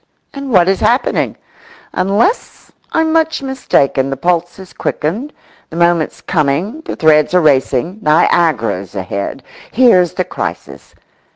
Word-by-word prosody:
And 275 -1 -6
what 180 -5 +4
is 195 -1 +1
happening? 245 +3 +1 0.6
Unless 205 - -1 0.2
I'm 320 0 +1
much 320 -3 +1
mistaken, 140 - 0
the 135 - -3
pulse's 175 +4 -2
quickened, 210 - -3 0.4
the - - -10
moment's 170 -1 +1
coming, 165 - -1
the - - -5
threads 155 +1 +3
are - - +6
racing, 145 - +1
Niagara's 150 - +1
ahead. 100 +1 -4 0.3
Here's 200 - +4
the - - -1
crisis! - - -7
175 Hz, 120 wpm, -15 LUFS, 150-230 Hz, 0.6 s, are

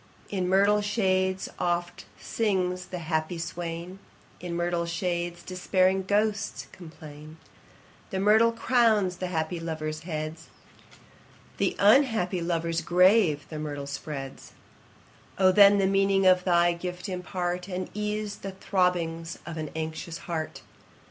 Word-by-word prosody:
In 185 -3 -1
myrtle 200 +2 +4
shades 190 -3 0
oft 175 0 -2
sings 185 -4 -1
the 185 - -6
happy 160 +1 -1
swain, 170 +2 -5 0.4
In 175 -1 -5
myrtle 175 0 -1
shades 175 -1 -3
despairing 185 +1 +1
ghosts 210 +1 0
complain; 155 -3 -12 0.7
The 190 - -3
myrtle 220 +3 +5
crowns 225 -6 +2
the 185 - -3
happy 165 0 -2
lovers' 155 -2 -4
heads, 160 -1 -5 1.1
The - - 0
unhappy 210 -5 +3
lovers' 170 -1 -1
grave 180 -2 +4
the 155 - -6
myrtle 145 -2 -5
spreads: 140 -1 -7 0.8
O 185 -1 +5
then 200 +1 +7
the 195 - +2
meaning 195 0 +2
of 185 -1 +5
thy 175 -1 +4
gift 180 +2 -6
impart, 180 -1 -3
And 185 -1 -4
ease 210 0 -3
the 195 -1 -7
throbbings 175 -4 -1
of 170 - -6
an 155 -1 -4
anxious 160 +1 -5
heart! 160 -2 -4
180 Hz, 125 wpm, -27 LUFS, 165-195 Hz, 1.1 s, then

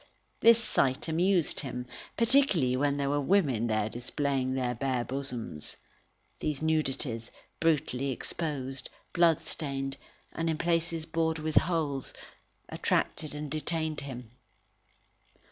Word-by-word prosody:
This 230 0 +8
sight 135 - +1
amused 175 +1 +2
him, 125 -3 -4 0.3
particularly 225 - +4
when 140 +2 +1
there 140 -1 0
were 145 0 +2
women 140 - +3
there 110 -1 +1
displaying 130 +3 -1
their 125 -2 0
bare 125 0 0
bosoms. 125 - -4 0.6
These 150 -3 -1
nudities, 135 -7 0 0.3
brutally 140 -4 +1
exposed, 135 -1 -3 0.2
bloodstained, 155 -5 +1 0.4
and 165 0 -1
in 160 - 0
places 165 -1 +1
bored 160 0 0
with 155 0 -3
holes, 155 -6 +1 0.5
attracted 150 -1 0
and 150 -1 -5
detained 155 0 -2
him. 125 -4 -7
145 Hz, 110 wpm, -30 LUFS, 130-165 Hz, 0.6 s, This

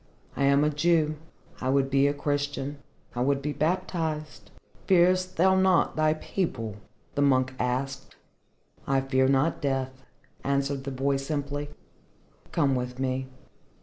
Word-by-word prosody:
"I 140 - +1
am 140 +1 +4
a 150 - +2
Jew. 155 0 +2 0.4
I 130 - -2
would 135 0 +2
be 135 +1 +4
a 145 - +1
Christian. 145 -1 -2 0.3
I 120 - -3
would 135 +2 +2
be 145 +1 -3
baptized." 155 -2 -2 0.4
"Fearest 185 0 +3
thou 190 +3 +5
not 190 -2 +3
thy 155 0 +2
people?" 115 - -3 0.4
the 145 - 0
monk 130 -2 +3
asked. 135 +2 -2 0.7
"I 135 0 +2
fear 130 0 +2
not 135 +4 +2
death," 135 -2 -1 0.5
answered 140 -1 -1
the 135 - -3
boy 135 +1 0
simply. 145 +1 -3 0.8
"Come 145 -5 +2
with 125 0 -3
me." 130 0 -2
140 Hz, 140 wpm, -27 LUFS, 135-155 Hz, 0.8 s, thou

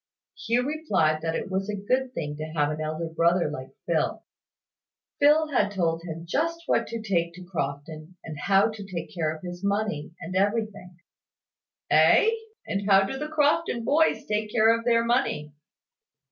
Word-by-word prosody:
Hugh 240 +2 0
replied 225 - +1
that 165 0 -2
it 195 - -4
was 195 +2 -2
a 210 - -1
good 255 +6 -1
thing 150 -2 -3
to 155 - -4
have 145 0 +2
an 155 +1 -4
elder 155 +2 -3
brother 170 0 +2
like 130 -2 -8
Phil. - - -1 1.0
Phil 305 +2 +5
had 255 -7 +2
told 165 -4 -1
him 165 -1 -7
just 335 - -1
what - - +1
to 230 -1 -5
take 170 -5 0
to 180 - -10
Crofton, 155 0 -5
and 155 -3 -8
how 195 +5 +3
to 215 -2 -8
take 185 -4 -6
care 160 -3 -1
of 155 +1 -9
his 175 +1 -7
money, 200 -6 -2
and 185 +3 -6
everything. 205 -3 -1 0.9
"Ay! 450 +1 +5 0.3
And 200 +1 -2
how 195 0 +6
do 195 - -3
the 300 - -3
Crofton 300 -4 +1
boys 315 +5 +2
take 210 0 -2
care 225 +1 +5
of 230 0 -6
their 230 -1 +3
money?" 235 - 0
195 Hz, 175 wpm, -26 LUFS, 165-230 Hz, 1.0 s, how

